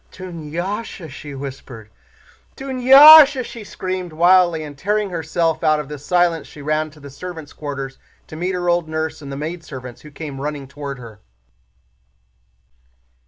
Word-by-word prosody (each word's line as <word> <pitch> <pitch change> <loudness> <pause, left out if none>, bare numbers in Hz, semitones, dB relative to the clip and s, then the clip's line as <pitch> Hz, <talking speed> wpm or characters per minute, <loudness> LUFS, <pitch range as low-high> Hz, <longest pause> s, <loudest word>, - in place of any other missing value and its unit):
"Dunyásha," 175 +2 -6
she 145 +1 -9
whispered. 130 -5 -9 0.7
"Dunyásha!" 270 +2 +8
she 230 - -9
screamed 185 -3 -5
wildly, 175 0 +4
and 145 -1 -9
tearing 205 +6 -1
herself 165 0 -1
out 155 0 +3
of 150 -2 -6
this 145 -2 -8
silence 175 -2 +1
she - - -14
ran 155 +1 -1
to 150 0 -18
the 140 -1 -11
servants' 160 0 -9
quarters 140 -2 -6 0.3
to - - -11
meet 180 +3 -2
her 175 -1 -3
old 175 -2 +1
nurse 160 -1 -3
and 140 -1 -8
the 135 - -5
maidservants 140 -6 -7
who 150 - -12
came 145 -2 -8
running 145 -1 -5
toward 140 0 -7
her. 115 -4 -12
155 Hz, 150 wpm, -20 LUFS, 145-180 Hz, 0.7 s, Dunyásha